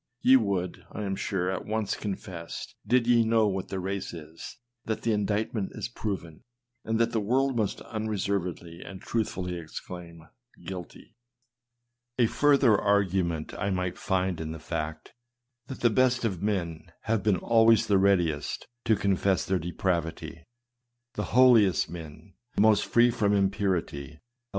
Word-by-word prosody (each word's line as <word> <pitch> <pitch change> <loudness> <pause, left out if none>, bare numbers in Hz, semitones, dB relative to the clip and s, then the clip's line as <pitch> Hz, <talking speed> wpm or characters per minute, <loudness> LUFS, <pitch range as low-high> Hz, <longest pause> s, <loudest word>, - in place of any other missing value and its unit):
Ye 130 - +7
would, 100 -7 0
I 105 - -5
am 95 -1 -2
sure, 95 -2 -1
at 95 - -3
once 110 -1 -1
confess, 95 -4 -6
did 125 -1 +3
ye 120 -1 +5
know 110 -1 +3
'what 95 -2 -1
the 95 - -4
race 95 -1 -4
is, 80 +5 -10 0.3
that 110 - -3
the 115 - +2
indictment 105 0 -1
is - - -4
proven, 95 -9 -5 0.4
and 110 0 -1
that 115 - +2
the 115 - 0
world 130 +5 +1
must 110 -4 -1
unreservedly 95 -6 -3
and 95 -1 -9
truthfully 90 -6 -2
exclaim, 85 0 -9 0.2
" 120 - -23
guilty." 90 -2 -8 1.0
A 120 - +5
further 140 -2 +4
argument 95 -5 +1
I 100 - -2
might 90 -1 -1
find 95 -3 -1
in 80 0 -4
the 80 - -8
fact, 80 -1 -5 0.5
that 130 - -8
the 120 - +4
best 130 +1 +2
of 95 -6 -2
men 90 -6 -2
have 110 -1 0
been 100 -2 +2
always 115 +3 +4
the 100 -2 +3
readiest 85 -7 +1 0.2
to 110 -2 +4
confess 95 -1 +1
their 95 -1 0
depravity. 85 -1 -3
95 Hz, 130 wpm, -28 LUFS, 90-110 Hz, 1.0 s, Ye